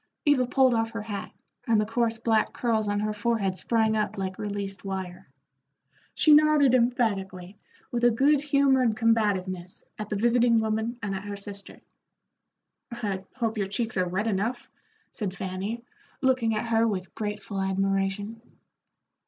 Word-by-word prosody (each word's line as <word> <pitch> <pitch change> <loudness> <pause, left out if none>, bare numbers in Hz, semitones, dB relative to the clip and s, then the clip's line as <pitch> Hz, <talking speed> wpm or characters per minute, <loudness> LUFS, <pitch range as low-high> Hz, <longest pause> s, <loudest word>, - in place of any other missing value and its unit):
Eva 275 -4 +3
pulled 260 0 +4
off 225 -1 +1
her 225 -1 -5
hat, 205 -2 -5 0.4
and 225 -2 +4
the 215 - +1
coarse 230 +1 0
black 225 -1 +1
curls 220 -3 0
on 205 0 0
her 215 0 -1
forehead 210 -3 0
sprang 220 +2 +1
up 215 0 -1
like 190 -1 -4
released 200 -1 -4
wire. 190 -5 -6 0.9
She 305 - +6
nodded 300 -3 +5
emphatically 205 -6 0 0.3
with 240 0 -2
a 240 - +7
good 275 +5 +3
humored 270 -5 +3
combativeness 195 -6 0 0.2
at 215 -1 -5
the 210 - -1
visiting 235 +2 +3
woman 220 +2 -1
and 200 -1 -2
at 190 +1 -5
her 205 0 -5
sister. 200 0 -10 1.1
"I 205 -5 -4
hope 225 -3 -2
your 195 - 0
cheeks 225 +3 -3
are 185 -1 0
red 190 +4 -1
enough," 220 +3 -2 0.4
said 195 -4 -4
Fanny, 195 +5 -4 0.4
looking 255 -4 +2
at 220 +2 -3
her 230 0 +3
with 190 -4 -3
grateful 210 -2 -4
admiration. 195 +3 -1
215 Hz, 155 wpm, -27 LUFS, 195-235 Hz, 1.1 s, a